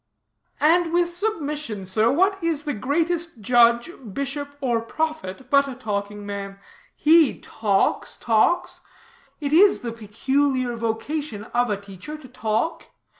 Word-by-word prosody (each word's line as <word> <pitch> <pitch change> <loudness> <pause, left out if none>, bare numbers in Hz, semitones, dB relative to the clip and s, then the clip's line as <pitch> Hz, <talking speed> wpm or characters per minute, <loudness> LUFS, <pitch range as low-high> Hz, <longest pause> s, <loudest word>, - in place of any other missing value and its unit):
"And 330 +2 +3
with 345 0 +3
submission, 300 - -3
sir, 215 +5 +2
what 380 +5 +2
is 325 -3 +1
the 295 -2 -2
greatest 330 +6 -1
judge, 235 - +4 0.2
bishop 285 +1 -4
or 240 -5 0
prophet, 265 -4 -4
but 280 0 +5
a 265 - -6
talking 205 -3 -4
man? 200 -1 -6 0.4
He 315 -2 +4
talks, 205 -3 0
talks. 230 +9 +1 0.6
It 290 -1 -2
is 390 +5 +6
the 235 - -4
peculiar 255 +3 0
vocation 230 +1 -3
of 245 0 +2
a 205 - 0
teacher 200 +9 -9
to 295 -4 -13
talk. 235 +4 -2
265 Hz, 130 wpm, -23 LUFS, 220-310 Hz, 0.6 s, is